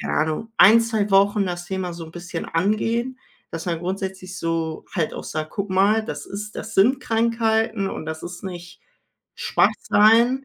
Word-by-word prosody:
keine - - -2
Ahnung, 160 +9 -1
1, 225 +4 +8
2 220 -3 -1
Wochen 200 +1 +4
das 175 -1 -4
Thema 185 -1 -3
so 170 -1 -7
'n - - -12
bisschen 175 0 -6
angehen, 230 +8 -1 0.3
dass 165 +1 -5
man 170 -2 -1
grundsätzlich 190 +1 -5
so 165 -2 -2
halt 165 -5 -1
auch - - -6
sagt: 155 0 -4
„Guck 200 -1 -4
mal, 205 +4 +3
das 145 -6 -6
ist 210 +2 -7
das 225 - -7
sind 245 +8 +4
Krankheiten 225 -3 +1
und - - -6
das 160 0 -6
ist 175 +2 -8
nicht 180 -1 -8 0.6
Schwach-sein.“ 235 +5 +3
195 Hz, 170 wpm, -22 LUFS, 175-220 Hz, 0.6 s, 1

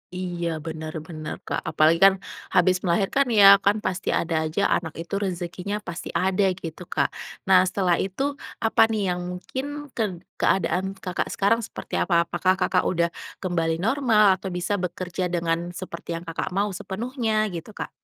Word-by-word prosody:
Iya, 175 -2 -3 0.2
benar 160 -1 -5
benar, 155 -2 -6
Kak. - - -2
Apalagi, 160 +2 +4
kan, 195 - +8 0.4
habis 185 0 +3
melahirkan, 200 +9 +1
ya. 200 -3 +8
Kan, 200 +2 +3
pasti 185 0 -2
ada 165 -1 +1
aja, 160 +5 -1
anak 165 -2 -4
itu 165 +3 -7
rezekinya 185 +2 -3
pasti 170 +1 -5
ada, 190 +2 +2
gitu, 165 -1 -7
Kak. - - 0 0.3
Nah, 185 -1 +6
setelah 185 -2 +1
itu, 270 +10 -2 0.2
apa, 225 - +2
nih, 200 -5 0
yang 180 - -4 0.2
mungkin 260 +8 -5 0.3
ked 190 -6 -3 0.2
keadaan 190 +1 +1
Kakak 180 -2 -3
sekarang 205 +4 +2
seperti 225 - -9
apa? 170 -2 +3
Apakah 185 +2 +1
Kakak 185 -1 +2
udah 170 -1 +1 0.3
kembali 165 -3 -1
normal, 215 -1 +4
atau 190 - -4
bisa 180 +2 -2
bekerja 180 0 -3
dengan 170 0 -1
seperti 175 -3 -8
yang 170 - -9
Kakak 165 -1 -3
mau 205 0 +1
sepenuhnya, 220 +2 -1
gitu, 170 +2 -6
Kak? 210 - -6
185 Hz, 165 wpm, -24 LUFS, 170-200 Hz, 0.4 s, kan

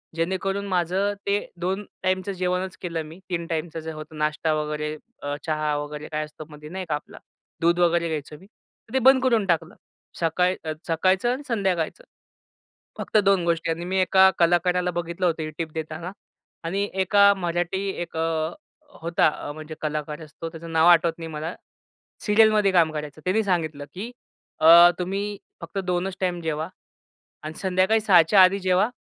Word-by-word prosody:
जेणेकरून 190 +4 -1
माझं 185 +2 0
ते 200 +1 +2 0.2
2 190 +3 -2 0.2
टाईमचं 185 +1 0
जेवणच 180 0 -2
केलं 165 -2 -3
मी 160 +4 -12
3 170 -2 -2
टाईमचं 165 0 -3
जे 160 0 -6
होतं, 155 0 -9
नाश्ता 155 +1 0
वगैरे 150 0 -2 0.3
अ, 145 0 -3
चहा 155 -2 0
वगैरे 150 +1 -6
काय 155 0 -1
असतो 155 +1 -11
मधी 150 0 -11
नाही 185 +2 -5
का 150 - +1
आपला. 150 - -9 0.4
दूध 170 +1 +3
वगैरे 170 -1 +3
घ्यायचो 150 -1 -5
मी. 190 - -16
तर 220 +1 -24
ते 265 - +3
बंद 265 0 +6
करून 230 -5 +3
टाकलं. 170 0 0 0.4
सकाळ 180 +2 +1
अ, 155 -1 -3
सकाळचं 185 +7 +2
आणि 270 +3 -6
संध्याकाळचं. 195 - -1 0.9
फक्त - - 0
2 195 -2 +4
गोष्टी 165 -1 0
आणि 170 +2 -4
मी 190 +2 -1
एका 190 +1 +6
कलाकाराला 180 +1 +2
बघितलं 170 +1 -3
होतं 165 -2 0
ही 155 - -4
टिप 165 -2 -4
देताना 160 +2 -5 0.5
आणि 195 +4 -1
एका 200 +2 +5
मराठी 175 +1 -2
एक 170 -1 -6
अ, 160 0 -1 0.5
होता 165 -3 0
म्हणजे 155 +1 -9
कलाकार 150 0 -3
असतो 155 +2 -8
त्याचं 165 0 -9
नाव 160 +1 +4
आठवत 170 -1 +5
नाही 165 - -6
मला 155 +3 -5 0.7
सीरियलमध्ये 210 -2 +4
काम 165 -3 +4
करायचं. 150 0 -6
त्यानी 195 +5 +2
सांगितलं, 160 -6 -1
की 205 +6 -6 0.5
अ, 170 +2 +9
तुम्ही 200 +3 -3 0.2
फक्त - - -6
2च 180 +1 -1
टाईम 180 -2 -1
जेवा 160 0 -2 0.7
आणि 155 +1 -6
संध्याकाळी 190 +3 +2
6च्या 190 -2 +6
आधी 185 +2 +5
जेवा 190 +3 +2
175 Hz, 165 wpm, -24 LUFS, 160-190 Hz, 0.9 s, अ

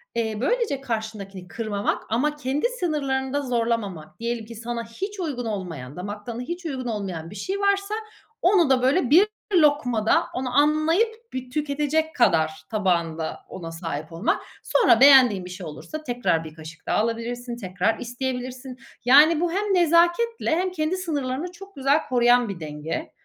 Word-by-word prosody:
eee, 220 -2 -1
böylece 410 - 0
karşındakini 215 -6 -5
kırmamak 215 -1 -2
ama 295 +7 +1
kendi 290 - -2
sınırlarını 280 - -2
da 285 - +1
zorlamamak, 230 - -2
diyelim 235 -1 -3
ki 230 +1 -10
sana 235 +1 -4
hiç 385 - -6
uygun 275 -9 -3
olmayan, 170 - -5
damak 205 +3 -6
tadına 235 0 -5
hiç 345 +6 -6
uygun 260 -5 -3
olmayan 190 -7 -4
bir 205 - -11
şey 390 - -3
varsa 400 +1 +1 0.5
onu 355 -5 +4
da 255 -2 +4
böyle 260 +1 +2
bir 365 +8 +7 0.3
lokmada, 285 -9 +3
onu 255 +1 -2
anlayıp 335 +11 +2
bir 255 -1 -5
tüketecek 300 +2 -1
kadar 160 -10 +3 0.2
tabağında 170 -6 -1
ona 165 -3 -7
sahip 165 -1 -5
olmak. 170 +6 0 0.2
Sonra 400 - +4
beğendiğin 255 -9 +7
bir - - -8
şey 180 -1 -7
olursa 305 - -7
tekrar 235 - 0
bir 155 - -9
kaşık 160 0 -11
daha - - +1
alabilirsin, 235 +2 -2
tekrar 185 +1 -1
isteyebilirsin. 250 +1 -5 0.3
Yani 300 +5 +7
bu 345 -1 +1
hem 395 +3 0
nezaketle 345 +6 +3
hem 365 +1 0
kendi 320 +1 -1
sınırlarını 300 -2 -3
çok 390 +2 -13
güzel 275 +3 +3
koruyan 245 -2 +4
bir 185 -3 -5
denge, 155 - -5
250 Hz, 155 wpm, -24 LUFS, 205-310 Hz, 0.5 s, bir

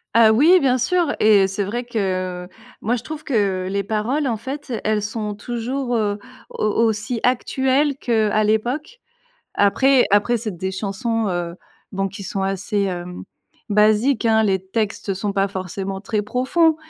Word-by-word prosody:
Ah 225 -1 +7
oui, 325 +11 +6
bien 260 -3 +2
sûr 340 +6 +1
et 205 -3 +5
c'est 195 +1 -2
vrai 235 +5 -3
que, 185 -5 -2
heu, - - -13 0.3
moi, 230 +4 0
je 240 - -4
trouve 310 -1 -7
que 195 -7 0
les 200 +1 -1
paroles, 225 +8 -1
en 230 -3 -1
fait, 275 +4 -7
elles 215 -1 +1
sont 210 0 -3
toujours, 240 +4 -3
heu, 205 -1 -1 0.3
au - - -3 0.2
aussi 220 +2 -1
actuelles 265 +3 +1
qu'à 215 -4 +1
l'époque. 245 - -1 0.6
Après 260 +6 +4
après 205 +4 +3
c'est 215 -4 -4
des 190 +2 -3
chansons, 210 +3 -2
heu, 175 -1 -3 0.4
bon 195 0 -1
qui 195 +1 -9
sont 195 0 -3
assez, 195 +2 -1
hem, 180 -2 -4 0.5
basiques, 215 +4 +3
hein, 220 -1 +4
les 195 -3 +2
textes 210 -1 -2
sont 200 +2 -2
pas 195 0 +1
forcément 190 +1 -5
très 210 +1 -1
profonds, 265 +9 +2
215 Hz, 165 wpm, -21 LUFS, 195-245 Hz, 0.6 s, Ah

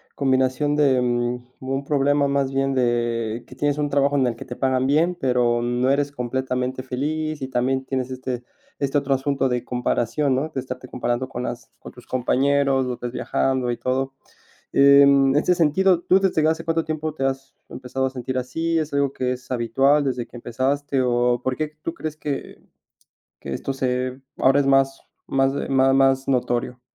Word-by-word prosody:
combinación 130 +2 +1
de, 135 -4 +3
mm, 120 0 -1
un 135 +1 -3
problema 145 0 +2
más 140 -1 0
bien 135 0 +1
de 120 -2 0
que 125 - -13
tienes 145 +1 0
un 145 -1 -1
trabajo 140 0 +2
en 130 -2 +3
el 115 - -2
que - - -10
te 125 - -7
pagan 130 -1 +1
bien, 165 +5 +2
pero 120 -2 +2
no 120 +2 0
eres 140 +1 +1
completamente 130 0 -3
feliz, 155 +4 -3
y 130 - -3
también 130 +1 0
tienes 130 -1 -3
este 125 -1 -4 0.4
este 140 0 0
otro 140 -1 +1
asunto 135 0 0
de 125 -1 -1
comparación, 125 +2 0
¿no? 145 +5 -1
De 135 - -4
estarte 130 0 -7
comparando 125 +1 -2
con 125 -1 -5
las 120 -1 -6
con - - -11
tus 125 - -16
compañeros, 135 +1 +1
los 125 - -4
ves 120 -1 -4
viajando 130 0 -1
y 120 - -3
todo. 135 +1 -1 0.6
En 140 -1 +6
ese 180 +4 +3
sentido, 175 +2 +3
¿tú 190 - +4
desde 170 -5 +2
hace 160 +1 0
cuánto 165 0 0
tiempo 155 0 -3
te 135 -3 -3
has 135 0 -3 0.2
empezado 130 +1 -4
a - - -2
sentir 130 0 -5
así? 165 +7 -2
¿Es 155 -2 -3
algo 140 -1 +1
que 125 0 -1
es 125 0 -9
habitual 135 +4 +2
desde 125 -3 -2
que 120 - -13
empezaste? 135 +4 -1
¿O 120 0 +1
por 130 -1 -1
qué 155 0 -3
tú 165 - -4
crees 155 -2 -5
que 145 -3 -5 0.8
que - - -5
esto 135 - -3
se 130 0 -2 0.2
ahora 135 +2 +4
es 140 - 0
más 135 0 +2 0.3
más 135 0 +2
de 140 - -3
ma 135 0 +3
más 135 0 +3
notorio? 125 -1 -1
135 Hz, 190 wpm, -22 LUFS, 125-140 Hz, 0.8 s, En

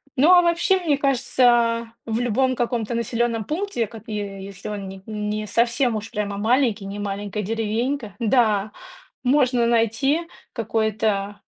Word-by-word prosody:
Ну, 290 +6 +4
а 355 -1 +7
вообще, 345 +3 +3
мне 325 -5 +1
кажется, 240 -4 +2
в 225 0 -1
любом 255 +2 +1
каком-то 240 -2 -1
населенном 230 -1 -1
пункте, 320 - -2
как 220 0 -11
и 220 - -5
е 195 -2 -5
если 195 0 -8
он 205 -2 -5
ни 190 0 -9
не 210 0 -3
совсем 235 +3 +1
уж 215 +1 -5
прямо 205 -3 -3
маленький, 225 -1 +1
не 200 +1 -6
маленькая 205 0 -3
деревенька, 225 +2 -2
да, 215 -3 +2 0.5
можно 255 -2 +3
найти 235 +8 +1 0.3
какое-то 215 -2 -1
225 Hz, 145 wpm, -23 LUFS, 210-250 Hz, 0.5 s, а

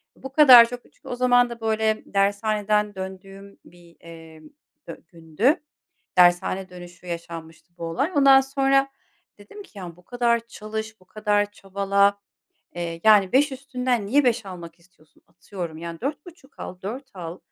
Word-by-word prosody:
Bu 270 - -10
kadar 260 -6 +9
çok." 245 0 -7
Çünkü - - -21
o 245 - -4
zaman 245 -1 +3
da, 235 -1 -9
böyle, 220 0 0
dershaneden 205 +1 0
döndüğüm 195 +1 -10
bir, 170 -1 -19
eee, 165 -1 -13 0.5
dü - - -10
gündü. 170 - -1 0.6
Dershane 180 +1 +3
dönüşü 175 0 -13
yaşanmıştı 165 0 -9
bu 170 - -6
olay. 165 - -2
Ondan 275 -1 +7
sonra 270 0 +1 0.5
dedim 210 - -12
ki, 210 - -16
"Ya, 175 -3 -9
bu 180 - -22
kadar 235 0 0
çalış, 220 -1 -7
bu - - -22
kadar 205 +1 -1
çabala, 200 +1 0 0.6
eee, 170 -1 -5
yani, 205 -4 +5
5 285 +2 +3
üstünden 255 -4 -2
niye 280 +6 +2
5 235 -4 0
almak 175 -3 -10
istiyorsun? 170 -3 -28
Atıyorum, 175 -2 -8
yani, 170 0 -8
4,5 290 +1 -8
al, 180 - -8
4 255 +7 -7
al. 175 -1 -8
205 Hz, 150 wpm, -23 LUFS, 175-245 Hz, 0.6 s, kadar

